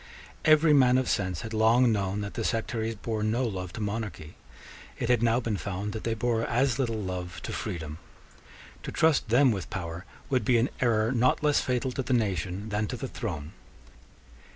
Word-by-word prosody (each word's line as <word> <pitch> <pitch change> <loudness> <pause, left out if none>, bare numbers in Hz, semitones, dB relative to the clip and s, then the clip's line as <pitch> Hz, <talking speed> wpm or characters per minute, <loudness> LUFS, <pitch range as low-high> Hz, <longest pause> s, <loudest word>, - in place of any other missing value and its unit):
Every 155 0 +6
man 130 -3 +5
of 130 - 0
sense 90 -4 -1
had 115 - -6
long 115 +3 +4
known 100 -1 -1
that 100 0 -5
the - - -3
sectaries 115 -1 -1
bore 110 +1 -3
no 110 +4 +1
love 95 -5 -4
to - - -6
monarchy. 105 -7 -4 0.6
It 120 - -2
had 120 -2 +3
now 120 0 +3
been 115 -4 -2
found 100 +2 -4
that 110 - -6
they 115 -1 0
bore 115 0 0
as 125 +2 +1
little 115 -4 0
love 90 -3 -5
to - - -5
freedom. 80 -3 -5 0.8
To - - -6
trust 160 -7 +2
them 125 +3 +5
with 95 -4 -4
power 85 -1 -5 0.2
would 130 -2 +1
be 125 -2 +3
an 115 +3 +2
error 115 -2 +2
not 130 +3 +2
less 150 -1 +3
fatal 130 +1 -1
to 135 - -2
the 130 - -1
nation 100 -2 -1
than 105 0 -1
to - - -4
the - - -4
throne. 75 +1 -5
110 Hz, 195 wpm, -28 LUFS, 100-125 Hz, 0.8 s, Every